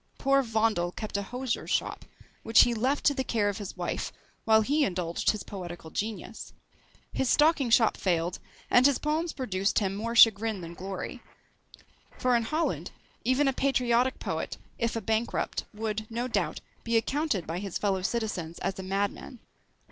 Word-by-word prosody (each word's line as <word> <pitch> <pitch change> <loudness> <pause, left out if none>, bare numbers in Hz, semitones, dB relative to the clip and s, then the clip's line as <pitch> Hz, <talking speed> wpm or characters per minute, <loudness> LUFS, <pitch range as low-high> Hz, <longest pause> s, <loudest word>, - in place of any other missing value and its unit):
Poor 275 0 +3
Vondel 220 -7 +1
kept 215 +2 -6
a 200 - +1
hosier's 245 +4 -3
shop, - - -1 0.4
which 225 - +6
he 240 - +4
left 255 +6 0
to 285 - +5
the 265 -1 -1
care 215 -5 +1
of 205 +1 -4
his 200 -3 -7
wife, - - -3 0.3
while 220 -1 +6
he 290 +7 +2
indulged 175 -7 -1
his 215 - 0
poetical 175 -4 -8
genius. 215 +2 -5 0.6
His 265 - 0
stocking 300 -4 +4
shop 225 -1 +4
failed, 175 -1 0 0.3
and 250 +2 +7
his 280 - +2
poems 310 +3 -1
produced 195 -7 -1
him 195 -2 +1
more 230 +3 -3
chagrin 220 -2 +5
than 170 0 -7
glory; 190 +2 -6 1.0
for 250 -1 +2
in 235 - +3
Holland, 315 +7 -1 0.3
even 255 +3 +2
a 270 - +2
patriotic 255 -1 +2
poet, - - -4 0.2
if 230 0 0
a 225 - -2
bankrupt, 220 +3 -1
would, 215 0 -3
no 235 +2 -2
doubt, 255 - -1 0.2
be 230 0 +2
accounted 250 - 0
by 165 +3 -3
his 195 -2 -4
fellow 195 -2 0
citizens 190 -6 -2
as 195 - -3
a - - -2
madman. 200 +6 -3
225 Hz, 170 wpm, -28 LUFS, 195-255 Hz, 1.0 s, and